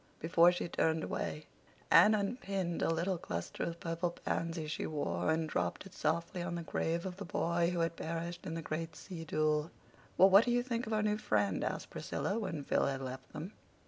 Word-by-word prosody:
Before 170 Hz, +2 st, +5 dB
she 175 Hz, -, -3 dB
turned 160 Hz, -1 st, +1 dB
away, 150 Hz, -, -3 dB, 0.5 s
Anne 195 Hz, +7 st, +8 dB
unpinned 195 Hz, -5 st, -2 dB
the -, -, +2 dB
little 170 Hz, +2 st, 0 dB
cluster 85 Hz, -, -5 dB
of 170 Hz, 0 st, -2 dB
purple 165 Hz, +1 st, -1 dB
pansies 165 Hz, -2 st, -3 dB
she -, -, -2 dB
wore 90 Hz, -, -1 dB
and 160 Hz, 0 st, +1 dB
dropped 90 Hz, -, -2 dB
it 195 Hz, -, -12 dB
softly 170 Hz, +3 st, -1 dB
on 175 Hz, 0 st, -3 dB
the 170 Hz, -, -4 dB
grave 165 Hz, +1 st, -1 dB
of 185 Hz, -1 st, -5 dB
the 200 Hz, -, -5 dB
boy 170 Hz, -1 st, +1 dB
who 175 Hz, -1 st, 0 dB
had 165 Hz, 0 st, 0 dB
perished 170 Hz, +2 st, -4 dB
in 165 Hz, -, -3 dB
the 165 Hz, -, -4 dB
great 155 Hz, +1 st, -4 dB
sea 170 Hz, -2 st, -8 dB
duel. 155 Hz, 0 st, +1 dB, 0.5 s
"Well, 190 Hz, +1 st, +7 dB
what 200 Hz, +4 st, +8 dB
do -, -, 0 dB
you 245 Hz, 0 st, +2 dB
think 235 Hz, -2 st, -2 dB
of 220 Hz, -, -2 dB
our 215 Hz, 0 st, +2 dB
new 210 Hz, 0 st, +1 dB
friend?" 105 Hz, -, +1 dB
asked -, -, -3 dB
Priscilla, 205 Hz, +4 st, -2 dB
when 165 Hz, -9 st, -3 dB
Phil -, -, +2 dB
had 135 Hz, -1 st, -2 dB
left 130 Hz, 0 st, -7 dB
them. 165 Hz, +7 st, -6 dB
170 Hz, 210 wpm, -34 LUFS, 155-185 Hz, 0.5 s, Anne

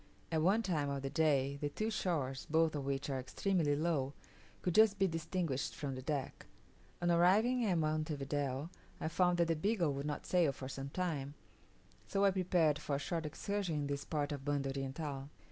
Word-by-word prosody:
At 160 Hz, -1 st, +2 dB
one 200 Hz, +7 st, +3 dB
time 155 Hz, -8 st, 0 dB
of 140 Hz, -1 st, -3 dB
the 135 Hz, -, -3 dB
day, 140 Hz, -3 st, +2 dB
the 145 Hz, -, 0 dB
two 215 Hz, +9 st, -2 dB
shores, 145 Hz, -10 st, -1 dB
both 160 Hz, 0 st, +3 dB
of 145 Hz, -3 st, -3 dB
which 135 Hz, 0 st, -1 dB
are 135 Hz, -, -1 dB
extremely 150 Hz, +3 st, +1 dB
low, 145 Hz, -3 st, 0 dB, 0.5 s
could 180 Hz, -, +1 dB
just 215 Hz, 0 st, +6 dB
be 195 Hz, 0 st, +3 dB
distinguished 165 Hz, -4 st, -2 dB
from 140 Hz, -2 st, -3 dB
the 130 Hz, -, -5 dB
deck. 145 Hz, 0 st, -3 dB, 0.6 s
On 175 Hz, -, +3 dB
arriving 210 Hz, +9 st, +4 dB
at 180 Hz, -3 st, +2 dB
Monte 155 Hz, 0 st, 0 dB
Video 140 Hz, +2 st, -2 dB, 0.3 s
I -, -, -2 dB
found 175 Hz, +1 st, +3 dB
that 170 Hz, -1 st, +3 dB
the 165 Hz, -, +2 dB
Beagle 175 Hz, -2 st, +1 dB
would 140 Hz, +2 st, -3 dB
not 150 Hz, -, -4 dB
sail 170 Hz, -6 st, +3 dB
for 130 Hz, -1 st, -7 dB
some 135 Hz, +1 st, -5 dB
time, 150 Hz, -4 st, -2 dB, 0.7 s
so 200 Hz, 0 st, +2 dB
I 195 Hz, -, +5 dB
prepared 175 Hz, -5 st, +2 dB
for 150 Hz, -1 st, -2 dB
a -, -, +1 dB
short 160 Hz, +2 st, -2 dB
excursion 195 Hz, +2 st, -2 dB
in 145 Hz, -1 st, -1 dB
this 140 Hz, 0 st, -2 dB
part 150 Hz, -2 st, -2 dB
of 140 Hz, -2 st, -4 dB
Banda 140 Hz, -1 st, 0 dB
Oriental. 135 Hz, 0 st, -4 dB
155 Hz, 195 wpm, -35 LUFS, 140-175 Hz, 0.7 s, just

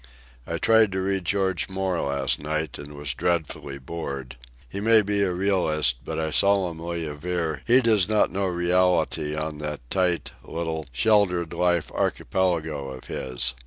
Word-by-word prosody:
I 85 Hz, -, -2 dB
tried 110 Hz, +1 st, +4 dB
to 95 Hz, -, -1 dB
read 95 Hz, -1 st, -1 dB
George 95 Hz, -6 st, 0 dB
Moore 95 Hz, -2 st, -1 dB
last 70 Hz, -1 st, 0 dB
night, 75 Hz, -1 st, -3 dB
and 75 Hz, +1 st, -8 dB
was 75 Hz, -1 st, -3 dB
dreadfully 80 Hz, -5 st, -2 dB
bored. 70 Hz, -3 st, -6 dB, 0.3 s
He 80 Hz, -, -6 dB
may 110 Hz, +1 st, +5 dB
be 100 Hz, 0 st, 0 dB
a 95 Hz, -2 st, +2 dB
realist, 90 Hz, -8 st, +1 dB
but -, -, -5 dB
I 80 Hz, -1 st, -1 dB
solemnly 85 Hz, -3 st, +1 dB
aver 80 Hz, +1 st, -3 dB
he 125 Hz, +2 st, +6 dB
does 110 Hz, -5 st, +3 dB
not 110 Hz, -1 st, +3 dB
know 95 Hz, 0 st, -1 dB
reality 90 Hz, -3 st, +1 dB
on 75 Hz, -1 st, -4 dB
that 75 Hz, -5 st, -5 dB
tight, 90 Hz, -2 st, +1 dB
little, 80 Hz, -3 st, -4 dB
sheltered 90 Hz, -, +2 dB
life 90 Hz, -2 st, +1 dB
archipelago 80 Hz, -3 st, -1 dB
of 65 Hz, -1 st, -9 dB
his. 65 Hz, -1 st, -1 dB
85 Hz, 155 wpm, -25 LUFS, 75-95 Hz, 0.3 s, he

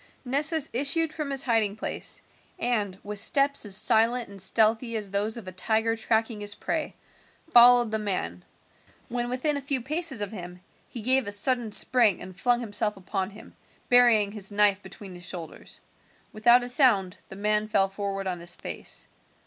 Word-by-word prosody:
Nessus 290 Hz, +4 st, 0 dB
issued 295 Hz, +5 st, 0 dB
from 305 Hz, -3 st, -5 dB
his 275 Hz, -1 st, -1 dB
hiding 225 Hz, -4 st, +1 dB
place, 220 Hz, -, -6 dB, 0.3 s
and, 210 Hz, -6 st, -2 dB
with 210 Hz, 0 st, -6 dB
steps 280 Hz, +1 st, +1 dB
as 190 Hz, -1 st, 0 dB
silent 230 Hz, +1 st, +1 dB
and 200 Hz, -1 st, -7 dB
stealthy 225 Hz, +4 st, +2 dB
as 205 Hz, -3 st, -5 dB
those 210 Hz, +3 st, -1 dB
of 220 Hz, -5 st, -10 dB
a -, -, -6 dB
tiger 220 Hz, +4 st, -1 dB
tracking 225 Hz, 0 st, -1 dB
his 205 Hz, 0 st, -2 dB
prey, 315 Hz, +6 st, -4 dB, 0.6 s
followed 240 Hz, -1 st, +7 dB
the 220 Hz, -, -1 dB
man. 180 Hz, -, -3 dB, 0.7 s
When 240 Hz, 0 st, -3 dB
within 270 Hz, +4 st, -1 dB
a -, -, -5 dB
few 275 Hz, -1 st, -1 dB
paces 305 Hz, +1 st, -1 dB
of 205 Hz, -, -5 dB
him 180 Hz, -3 st, -9 dB, 0.3 s
he 235 Hz, -, -8 dB
gave 260 Hz, -1 st, +3 dB
a -, -, -4 dB
sudden 230 Hz, +2 st, +3 dB
spring 230 Hz, -3 st, +4 dB
and 185 Hz, -, -10 dB
flung 245 Hz, +5 st, 0 dB
himself 210 Hz, -2 st, 0 dB
upon 190 Hz, 0 st, -4 dB
him, 210 Hz, +1 st, -15 dB, 0.3 s
burying 235 Hz, -5 st, +5 dB
his 205 Hz, -1 st, -4 dB
knife 205 Hz, -1 st, +2 dB
between 190 Hz, 0 st, -11 dB
his 175 Hz, -1 st, -6 dB
shoulders. 170 Hz, -4 st, -8 dB, 0.5 s
Without 240 Hz, +3 st, +4 dB
a 245 Hz, -, -5 dB
sound 210 Hz, -, +2 dB
the -, -, -9 dB
man 210 Hz, +1 st, 0 dB
fell 195 Hz, -2 st, +2 dB
forward 195 Hz, 0 st, -5 dB
on 180 Hz, -2 st, -4 dB
his 175 Hz, 0 st, -2 dB
face. -, -, -2 dB
220 Hz, 175 wpm, -26 LUFS, 200-245 Hz, 0.7 s, followed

